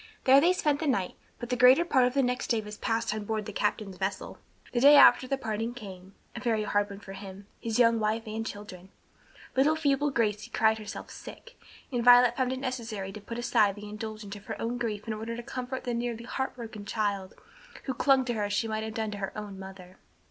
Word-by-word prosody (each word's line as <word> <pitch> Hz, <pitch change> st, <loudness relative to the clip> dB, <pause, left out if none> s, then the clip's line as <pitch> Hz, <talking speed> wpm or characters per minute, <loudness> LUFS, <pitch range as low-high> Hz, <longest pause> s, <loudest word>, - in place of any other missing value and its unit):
There 270 Hz, +1 st, +7 dB
they 345 Hz, +4 st, +5 dB
spent 300 Hz, -5 st, +1 dB
the 315 Hz, -, -2 dB
night, 195 Hz, -9 st, 0 dB, 0.2 s
but 240 Hz, -, -7 dB
the 250 Hz, -, +1 dB
greater 255 Hz, +7 st, +6 dB
part 260 Hz, -7 st, +3 dB
of 250 Hz, -, -4 dB
the 275 Hz, -, +3 dB
next 250 Hz, +1 st, -1 dB
day 230 Hz, -, +1 dB
was 210 Hz, 0 st, -7 dB
passed 225 Hz, 0 st, -1 dB
on 215 Hz, -1 st, -4 dB
board 215 Hz, 0 st, -3 dB
the 215 Hz, -, -7 dB
captain's 205 Hz, -2 st, -2 dB
vessel. 190 Hz, 0 st, -4 dB, 0.3 s
The 240 Hz, -, +1 dB
day 285 Hz, +4 st, +8 dB
after 260 Hz, -, +7 dB
the 275 Hz, -, 0 dB
parting 225 Hz, -1 st, -3 dB
came; 195 Hz, -4 st, -10 dB, 0.2 s
a -, -, -4 dB
very 225 Hz, -3 st, 0 dB
hard 205 Hz, 0 st, 0 dB
one 200 Hz, 0 st, -8 dB
for 195 Hz, -, -10 dB
him, 195 Hz, 0 st, -10 dB
his 225 Hz, -1 st, -2 dB
young 230 Hz, -2 st, +4 dB
wife 215 Hz, +1 st, 0 dB
and 220 Hz, +1 st, -4 dB
children. 205 Hz, -4 st, -8 dB, 0.7 s
Little 285 Hz, +4 st, +4 dB
feeble 290 Hz, -2 st, +1 dB
Gracie 215 Hz, -5 st, -1 dB
cried 220 Hz, 0 st, +2 dB
herself 215 Hz, -, -8 dB
sick, -, -, -11 dB, 0.4 s
and 245 Hz, -2 st, -1 dB
Violet 245 Hz, 0 st, +7 dB
found 255 Hz, -1 st, 0 dB
it 260 Hz, -, -2 dB
necessary 230 Hz, -7 st, -4 dB
to 215 Hz, -, -9 dB
put 230 Hz, +3 st, -7 dB
aside 215 Hz, -4 st, +2 dB
the 210 Hz, 0 st, -9 dB
indulgence 215 Hz, -1 st, -7 dB
of 205 Hz, 0 st, -12 dB
her 220 Hz, -, -5 dB
own 240 Hz, +2 st, -2 dB
grief 215 Hz, -3 st, -3 dB
in 225 Hz, -, -3 dB
order 225 Hz, +2 st, -5 dB
to 240 Hz, -, -7 dB
comfort 255 Hz, +2 st, -5 dB
the 245 Hz, -2 st, -2 dB
nearly 235 Hz, -1 st, -3 dB
heart 265 Hz, +2 st, -3 dB
broken 225 Hz, -4 st, -8 dB
child, 200 Hz, -3 st, -2 dB, 0.5 s
who 265 Hz, -, -3 dB
clung 270 Hz, 0 st, +3 dB
to 240 Hz, -, -1 dB
her 210 Hz, -2 st, -1 dB
as 205 Hz, -, -3 dB
she 225 Hz, +2 st, 0 dB
might 220 Hz, 0 st, -2 dB
have 220 Hz, 0 st, -6 dB
done 220 Hz, -1 st, -2 dB
to 205 Hz, -, -6 dB
her 195 Hz, +1 st, -5 dB
own 205 Hz, -2 st, -7 dB
mother. 190 Hz, -1 st, -11 dB
225 Hz, 235 wpm, -28 LUFS, 205-250 Hz, 0.7 s, day